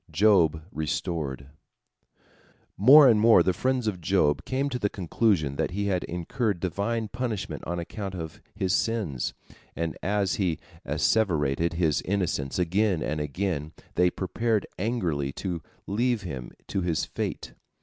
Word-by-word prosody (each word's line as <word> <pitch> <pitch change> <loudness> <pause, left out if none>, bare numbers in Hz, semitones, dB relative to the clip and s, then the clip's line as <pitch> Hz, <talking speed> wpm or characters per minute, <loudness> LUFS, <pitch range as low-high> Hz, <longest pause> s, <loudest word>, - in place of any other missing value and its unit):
JOB 85 -7 +4
RESTORED 75 -4 -3 1.3
More 135 +7 +8
and 115 -4 +5
more 115 +1 +6
the 95 - +2
friends 130 +5 0
of 95 -5 -2
Job 80 -4 +2
came 135 +2 0
to 125 -2 -3
the 105 - +1
conclusion 90 -6 0
that - - 0
he 100 +3 -2
had 95 -3 0
incurred 95 +4 -2
Divine 105 +6 -1
punishment 115 -4 -4
on 85 +1 -2
account 95 +3 -5
of 80 -3 -7
his 95 -1 0
sins, 100 - -1 0.4
and 85 -1 -2
as 100 0 0
he 90 -6 0 0.3
asseverated 85 -6 +1
his 80 -5 +1
innocence 90 -8 -1
again 90 0 +1
and 75 0 -2
again, 75 0 -2 0.2
they 90 +1 +4
prepared 105 +4 -1
angrily 90 - -1
to 90 -4 -4 0.2
leave 120 +2 0
him 65 -9 -6
to 95 - -2
his 85 -3 0
fate. - - -4
95 Hz, 140 wpm, -27 LUFS, 80-105 Hz, 1.3 s, More